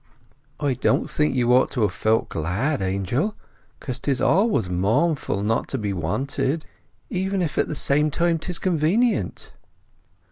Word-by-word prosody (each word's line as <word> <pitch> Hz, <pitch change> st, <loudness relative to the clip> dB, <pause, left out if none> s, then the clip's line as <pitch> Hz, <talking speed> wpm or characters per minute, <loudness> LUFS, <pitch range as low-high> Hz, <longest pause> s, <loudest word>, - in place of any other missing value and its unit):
"I 145 Hz, -3 st, +1 dB
don't 125 Hz, -, +1 dB
think 150 Hz, -3 st, 0 dB
you 125 Hz, -1 st, +3 dB
ought 130 Hz, +1 st, +4 dB
to 120 Hz, -, 0 dB
have 105 Hz, -, +1 dB
felt 110 Hz, +1 st, +1 dB
glad, 100 Hz, -, -1 dB
Angel. 100 Hz, -, -1 dB, 0.4 s
Because 130 Hz, -4 st, -5 dB
'tis 135 Hz, -3 st, -1 dB
always 195 Hz, -, +2 dB
mournful 100 Hz, -, 0 dB
not 115 Hz, +2 st, 0 dB
to 135 Hz, -, -3 dB
be 105 Hz, -4 st, -2 dB
wanted, 135 Hz, -, -2 dB, 0.5 s
even 190 Hz, +1 st, -1 dB
if 165 Hz, -5 st, -1 dB
at -, -, +2 dB
the 150 Hz, -, -4 dB
same 150 Hz, +2 st, +2 dB
time 170 Hz, +2 st, +1 dB
'tis 175 Hz, +2 st, -3 dB
convenient." 180 Hz, -, 0 dB
135 Hz, 150 wpm, -23 LUFS, 110-165 Hz, 0.5 s, ought